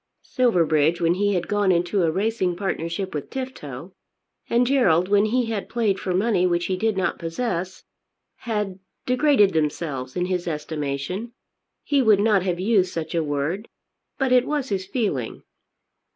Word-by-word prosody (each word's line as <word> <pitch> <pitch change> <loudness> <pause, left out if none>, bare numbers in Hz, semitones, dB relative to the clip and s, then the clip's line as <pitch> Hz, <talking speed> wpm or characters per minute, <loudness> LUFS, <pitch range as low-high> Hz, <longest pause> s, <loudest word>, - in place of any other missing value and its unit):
Silverbridge 170 - +2
when 170 0 +3
he 205 +2 +1
had 175 -1 -1
gone 205 -2 +2
into 175 +3 +1
a 165 - +3
racing 190 0 0
partnership 185 0 -3
with 150 - -5
Tifto, 185 - -7 0.6
and 240 +1 +3
Gerald 190 -10 +3
when 205 +1 +4
he 245 +3 +1
had 220 -3 -4
played 220 -5 0
for 185 - -3
money 185 -1 +2
which 175 0 0
he 185 - -1
did 220 +2 0
not 190 - -1
possess, 180 +1 -3 0.5
had 210 -5 -3 0.3
degraded 250 -6 +3
themselves 150 -4 -2
in 180 - 0
his 180 -1 -2
estimation. 150 +7 -4 0.5
He 285 -2 +2
would 215 -5 +5
not 205 -2 +3
have 180 -1 -2
used 190 -2 +2
such 160 -1 -4
a 165 -1 +1
word; 150 +8 -2 0.5
but 270 -2 0
it 250 0 +4
was 290 -3 -2
his 190 -2 -2
feeling. 195 - -2
190 Hz, 160 wpm, -23 LUFS, 170-220 Hz, 0.6 s, would